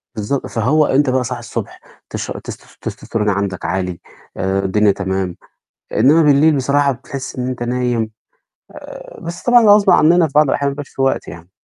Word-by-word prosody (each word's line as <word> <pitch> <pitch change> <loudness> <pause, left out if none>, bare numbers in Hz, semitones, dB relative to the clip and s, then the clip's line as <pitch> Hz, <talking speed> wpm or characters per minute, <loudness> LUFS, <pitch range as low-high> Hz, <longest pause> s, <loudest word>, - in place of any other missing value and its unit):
بالضبط. 110 +6 -2
فهو 140 +7 +2
أنت 135 0 +2
بقى 130 0 +1
صاحي - - -4
الصبح - - -6 0.3
تش - - -5
تس - - -11
تستستيرون 105 -2 -3
عندك 100 -3 -2
عالي 90 0 -2 0.4
آآ، 95 +1 0
الدنيا 105 +1 +3
تمام، 95 -2 -3 0.6
إنما 150 +8 +4
بالليل 150 +1 +4
بصراحة 140 +1 +2
بتحس 135 +2 -8
إن 125 0 -3
أنت 125 -1 -4
نايم 120 -2 -1 0.6
آآ، - - -11
بس 170 +1 -7
طبعًا 245 -1 +5
ده - - +4
غصب 205 -1 +5
عننا 165 +1 +5
في - - -15
بعض 150 +1 +6
الأحيان 140 +1 0
ما 140 - -4
بيبقاش 145 -1 -8
فيه 135 - -3
وقت 135 - 0
يعني. 85 +1 -11
130 Hz, 180 wpm, -17 LUFS, 100-145 Hz, 0.6 s, بعض